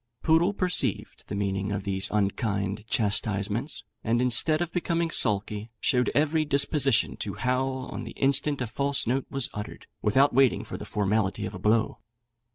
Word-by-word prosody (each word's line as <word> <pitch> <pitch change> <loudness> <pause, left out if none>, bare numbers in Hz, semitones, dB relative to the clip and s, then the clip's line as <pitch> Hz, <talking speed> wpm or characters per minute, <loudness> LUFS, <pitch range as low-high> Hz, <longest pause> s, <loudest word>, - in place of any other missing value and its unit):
Poodle 165 +4 +4
perceived 175 - -2
the - - -5
meaning 100 0 -2
of 100 -1 -3
these 95 -1 -1
unkind 100 0 -1
chastisements, 110 +4 -1 0.2
and 115 +2 +1
instead 125 +6 +3
of 175 -1 -3
becoming 170 -1 -1
sulky, 105 -1 +1
showed 125 -3 +1
every 155 +2 +2
disposition 140 -3 +3
to - - -4
howl 130 +1 -1
on - - -5
the - - -8
instant 140 +1 +1
a - - 0
false 140 +4 -2
note 130 +3 -1
was 135 -3 +1
uttered, 105 0 -7 0.2
without 135 +7 +3
waiting 135 0 +3
for - - -8
the - - -7
formality 105 -1 -1
of 95 - -6
a 95 - -7
blow. 110 +3 +1
120 Hz, 165 wpm, -27 LUFS, 105-140 Hz, 0.2 s, Poodle